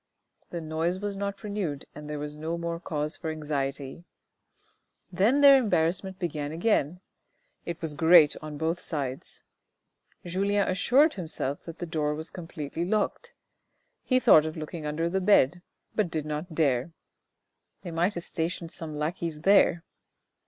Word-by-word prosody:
The 170 Hz, -, -5 dB
noise 160 Hz, +3 st, -1 dB
was 205 Hz, 0 st, -3 dB
not 200 Hz, +1 st, -4 dB
renewed 195 Hz, -9 st, -3 dB
and 150 Hz, 0 st, -9 dB
there 150 Hz, -, -3 dB
was 150 Hz, 0 st, -5 dB
no 160 Hz, +2 st, -3 dB
more 170 Hz, 0 st, -3 dB
cause 150 Hz, -2 st, -3 dB
for 160 Hz, -, -5 dB
anxiety. 145 Hz, -1 st, -3 dB, 1.1 s
Then 215 Hz, +10 st, +3 dB
their 280 Hz, -1 st, +9 dB
embarrassment 190 Hz, -5 st, +1 dB
began 150 Hz, -5 st, -3 dB
again; 175 Hz, -1 st, 0 dB, 0.7 s
it 170 Hz, -1 st, -4 dB
was 160 Hz, -2 st, -2 dB
great 160 Hz, 0 st, +6 dB
on 155 Hz, -1 st, -7 dB
both 165 Hz, +3 st, -1 dB
sides. 140 Hz, -7 st, -5 dB, 0.8 s
Julien 200 Hz, +3 st, +1 dB
assured 260 Hz, -, +4 dB
himself 155 Hz, -6 st, -3 dB
that 165 Hz, -1 st, -8 dB
the 175 Hz, -, -4 dB
door 150 Hz, -2 st, -1 dB
was 160 Hz, +1 st, -6 dB
completely 165 Hz, -2 st, -5 dB
locked; 210 Hz, +4 st, -1 dB, 0.7 s
he 255 Hz, -1 st, +2 dB
thought 155 Hz, -10 st, +6 dB
of 155 Hz, -, -6 dB
looking 155 Hz, 0 st, -5 dB
under 160 Hz, +3 st, -1 dB
the 190 Hz, +3 st, -1 dB
bed, 180 Hz, -4 st, +4 dB, 0.3 s
but 215 Hz, -4 st, +1 dB
he -, -, -12 dB
did 155 Hz, -2 st, -3 dB
not 155 Hz, +3 st, -5 dB
dare; 145 Hz, 0 st, +1 dB, 0.4 s
" -, -, -53 dB
they 175 Hz, -, -6 dB
might 175 Hz, +5 st, 0 dB
have 175 Hz, -, -4 dB
stationed 165 Hz, 0 st, -3 dB
one 160 Hz, -, -5 dB
or -, -, -7 dB
two -, -, -6 dB
lackeys 155 Hz, 0 st, -3 dB
there." 180 Hz, -2 st, +4 dB
165 Hz, 160 wpm, -27 LUFS, 150-185 Hz, 1.1 s, their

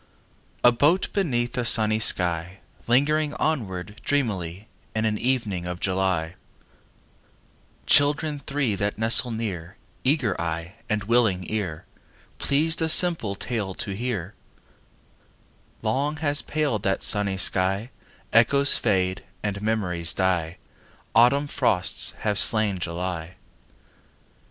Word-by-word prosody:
A 120 Hz, -, +8 dB
boat 150 Hz, +10 st, +2 dB
beneath 120 Hz, -11 st, -1 dB
a -, -, 0 dB
sunny 110 Hz, -2 st, +3 dB
sky, 90 Hz, -3 st, +1 dB, 0.3 s
Lingering 150 Hz, +5 st, +2 dB
onward 105 Hz, -, -3 dB
dreamily 100 Hz, -8 st, -2 dB, 0.3 s
In 110 Hz, 0 st, 0 dB
an 105 Hz, -1 st, 0 dB
evening 110 Hz, -9 st, -1 dB
of 90 Hz, 0 st, -5 dB
July— 95 Hz, -4 st, 0 dB, 1.5 s
Children 145 Hz, +1 st, +3 dB
three 135 Hz, -6 st, 0 dB
that 100 Hz, +1 st, -2 dB
nestle 115 Hz, +3 st, +4 dB
near, 100 Hz, -6 st, -5 dB, 0.3 s
Eager 130 Hz, -6 st, +1 dB
eye 85 Hz, +1 st, -4 dB, 0.2 s
and 105 Hz, -1 st, -1 dB
willing 105 Hz, -5 st, +2 dB
ear, 95 Hz, -8 st, -3 dB, 0.5 s
Pleased 160 Hz, +4 st, +1 dB
a 160 Hz, -, 0 dB
simple 160 Hz, -, +3 dB
tale 100 Hz, -3 st, -3 dB
to 100 Hz, -, -4 dB
hear— 110 Hz, -4 st, -4 dB, 1.5 s
Long 140 Hz, +7 st, -1 dB
has 145 Hz, -1 st, 0 dB
paled 145 Hz, -9 st, -1 dB
that 95 Hz, -1 st, -1 dB
sunny 100 Hz, -2 st, 0 dB
sky: 95 Hz, +4 st, 0 dB, 0.4 s
Echoes 140 Hz, +5 st, +4 dB
fade 95 Hz, 0 st, 0 dB, 0.2 s
and 100 Hz, -1 st, -3 dB
memories 90 Hz, -6 st, -1 dB
die. 90 Hz, -3 st, 0 dB, 0.6 s
Autumn 125 Hz, +5 st, +4 dB
frosts 125 Hz, -10 st, 0 dB
have 105 Hz, -2 st, +2 dB
slain 105 Hz, -4 st, +3 dB
July. 90 Hz, 0 st, -4 dB
110 Hz, 115 wpm, -24 LUFS, 95-130 Hz, 1.5 s, A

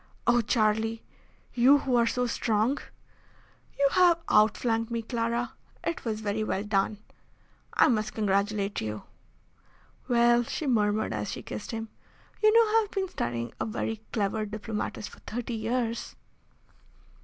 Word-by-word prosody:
"Oh! 240 Hz, -1 st, +4 dB
Charlie, 220 Hz, 0 st, +1 dB, 0.5 s
you 255 Hz, +4 st, +6 dB
who 265 Hz, -3 st, 0 dB
are 235 Hz, -1 st, +4 dB
so 250 Hz, +1 st, 0 dB
strong!" 230 Hz, +2 st, +1 dB, 1.0 s
"You 280 Hz, -, +4 dB
have 355 Hz, -2 st, +5 dB
outflanked 225 Hz, +2 st, +3 dB
me, 230 Hz, -1 st, -2 dB
Clara. 235 Hz, +1 st, -2 dB, 0.3 s
It 335 Hz, -, -3 dB
was 220 Hz, -1 st, -2 dB
very 210 Hz, +1 st, -1 dB
well 200 Hz, -2 st, -1 dB
done. 205 Hz, 0 st, 0 dB, 0.8 s
I -, -, +6 dB
must 215 Hz, -3 st, 0 dB
congratulate 200 Hz, -1 st, 0 dB
you." 105 Hz, -1 st, -4 dB, 1.0 s
"Well," 240 Hz, -1 st, +4 dB
she 240 Hz, +6 st, -4 dB
murmured, 215 Hz, -, +1 dB
as 105 Hz, -1 st, -3 dB
she -, -, -6 dB
kissed 105 Hz, -, -7 dB
him, 225 Hz, -1 st, -4 dB, 0.5 s
"you 430 Hz, 0 st, +6 dB
know 450 Hz, 0 st, +5 dB
I -, -, +3 dB
have 420 Hz, -, -5 dB
been 385 Hz, -2 st, -2 dB
studying 120 Hz, -, -3 dB
a -, -, -1 dB
very 220 Hz, 0 st, -3 dB
clever 215 Hz, 0 st, 0 dB
diplomatist 215 Hz, 0 st, -4 dB
for -, -, -14 dB
thirty 240 Hz, +1 st, -5 dB
years." 230 Hz, +1 st, -2 dB
225 Hz, 145 wpm, -28 LUFS, 210-245 Hz, 1.0 s, you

